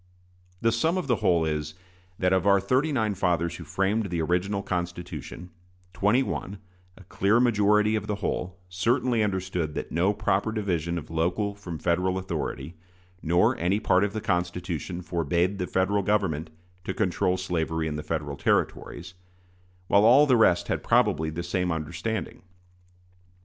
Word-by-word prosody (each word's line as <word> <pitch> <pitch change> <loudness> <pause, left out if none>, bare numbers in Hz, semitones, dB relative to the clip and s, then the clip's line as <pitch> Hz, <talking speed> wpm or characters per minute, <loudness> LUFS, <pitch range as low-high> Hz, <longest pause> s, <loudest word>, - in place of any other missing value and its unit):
The 115 - +3
sum 160 +10 +1
of 185 - -2
the 120 -4 +1
whole 85 -4 +2
is, 75 0 -3 0.4
that 90 0 +2
of 95 +1 +2
our 100 0 +6
thirty 130 +10 +1
nine 110 -6 0
fathers 85 -3 0
who - - -8
framed 100 +3 0
the 85 -1 -2
original 95 +4 0
Constitution, 90 0 -5 0.4
twenty 105 +8 +2
one 100 -5 -4 0.4
a 95 - -14
clear 100 +5 +2
majority 105 -2 +3
of 105 -1 -3
the 105 - -1
whole 95 -2 -3
certainly 115 +6 +1
understood 95 -6 -2
that - - -5
no 90 +5 +2
proper 105 0 0
division 85 -6 -1
of 80 - -7
local 90 +6 0
from 95 -5 -7
Federal 90 +3 0
authority, 85 -4 -4 0.5
nor 90 +10 +3
any 90 +5 +1
part 95 -3 +3
of 105 -1 -1
the 110 - -3
Constitution, 90 -1 -2
forbade 85 +3 0
the 90 - -2
Federal 100 +2 +1
Government 95 -7 0 0.3
to - - -4
control 90 -2 +1
slavery 80 -3 -2
in 75 - -3
the 75 - -3
Federal 75 -2 -4
Territories; 90 +5 -1 0.7
while 100 +2 +4
all 130 +6 +7
the 130 -4 +4
rest 100 -6 +3
had - - -1
probably 80 +1 +2
the 80 +2 -5
same 90 0 -1
understanding. 85 +9 -4
95 Hz, 160 wpm, -26 LUFS, 85-105 Hz, 0.7 s, all